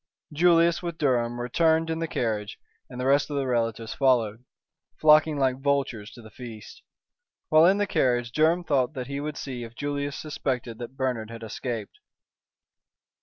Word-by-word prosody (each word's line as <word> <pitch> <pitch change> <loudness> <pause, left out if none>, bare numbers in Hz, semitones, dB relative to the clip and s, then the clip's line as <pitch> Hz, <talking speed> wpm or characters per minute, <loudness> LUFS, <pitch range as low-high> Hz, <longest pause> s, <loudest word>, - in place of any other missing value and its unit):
Julius 170 0 +4
with 170 -2 -5
Durham 120 -5 0
returned 160 +6 +2
in 160 - -2
the 165 - -2
carriage, 110 -7 -2 0.3
and 125 - -9
the 125 - -2
rest 140 +2 +3
of 145 - -4
the 140 -1 0
relatives 115 -2 -1
followed, 120 -4 +1 0.6
flocking 155 0 +5
like 130 -1 0
vultures 135 -7 -1
to 120 - -13
the 110 - -13
feast. 115 -2 -10 0.7
While 155 +2 +6
in 195 +2 +4
the 205 - +1
carriage 120 -9 +1
Durham 160 +5 +2
thought 140 -2 0
he 140 +2 -4
would 150 +1 -5
see 125 -3 -5
if 115 0 -10
Julius 145 0 -3
suspected 125 -6 -4
that 125 +2 -8
Bernard 125 -5 -2
had 115 0 -9
escaped. 110 -1 -5
130 Hz, 165 wpm, -26 LUFS, 120-155 Hz, 0.7 s, While